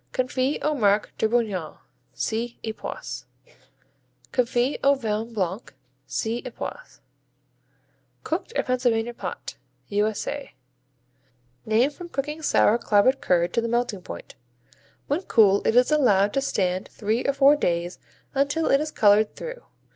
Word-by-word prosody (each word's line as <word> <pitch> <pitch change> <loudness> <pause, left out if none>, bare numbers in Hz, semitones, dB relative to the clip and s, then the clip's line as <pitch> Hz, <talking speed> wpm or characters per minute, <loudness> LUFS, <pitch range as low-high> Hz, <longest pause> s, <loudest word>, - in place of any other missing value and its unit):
Confits 255 +2 0
au 305 - +2
Marc 210 -6 +1
de 220 - +2
Bourgogne 210 -9 -1 0.3
see 230 +2 -3
Epoisses. 220 -1 -6 1.1
Confits 245 +2 +1
au 280 0 +5
Vin 225 -2 -3
Blanc 195 -1 -2 0.5
see 230 +1 -2
Epoisses. - - -8 1.2
Cooked, - - -3
or - - +2
Pennsylvania 240 -2 0
pot - - -7 0.3
U.S.A. 215 +7 -2 1.1
Named 235 +7 +3
from 350 +1 -9
cooking 300 +1 -4
sour 235 -6 +3
clabbered 235 +5 +3
curd 175 -8 +1
to 235 - +2
the 230 - -2
melting 235 -4 -1
point. - - -9 0.7
When 290 +6 -1
cool 205 - +4
it 220 - +2
is 250 +4 +5
allowed 205 -9 +3
to 275 - +1
stand 185 -7 -1
three 220 +3 -2
or 280 - +1
four 275 +1 +6
days 175 -8 -1 0.3
until 285 +4 +1
it 275 - +4
is 305 - -2
colored 210 -3 +3
through. - - -7
235 Hz, 130 wpm, -25 LUFS, 210-275 Hz, 1.2 s, four